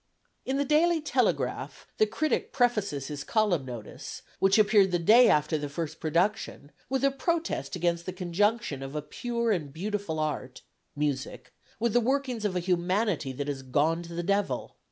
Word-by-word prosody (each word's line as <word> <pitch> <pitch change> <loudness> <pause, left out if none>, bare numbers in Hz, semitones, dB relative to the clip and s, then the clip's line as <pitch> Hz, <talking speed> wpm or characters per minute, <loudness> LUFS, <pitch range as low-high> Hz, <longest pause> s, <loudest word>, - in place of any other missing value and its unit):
In 265 +1 0
the 285 - +1
Daily 320 +4 +3
Telegraph 310 - -1
the 215 - +5
critic 310 +8 -1
prefaces 210 - +1
his 145 0 -5
column 195 - +1
notice, 120 -4 -8 0.2
which 195 +2 +4
appeared 210 -2 +5
the 180 - +1
day 225 +9 +6
after 150 +1 +2
the 145 -1 -4
first 155 +2 -5
production, 170 -2 -1 0.2
with 265 +1 0
a 275 - +4
protest 330 - -2
against 170 0 -1
the - - -1
conjunction 185 - 0
of 135 +2 -7
a 150 - -2
pure 235 +8 -2
and 155 -8 -1
beautiful 195 0 -3
art 150 -4 -3 0.3
music 130 -4 -3 0.3
with 230 -1 +1
the 245 - +4
workings 255 -2 -1
of 195 -3 0
a - - +2
humanity 180 -2 0
that 140 +2 -4
has 140 -2 -3
gone 150 +6 +1
to 170 0 -9
the 175 - -2
devil. 200 -9 -1
180 Hz, 175 wpm, -28 LUFS, 150-225 Hz, 0.3 s, day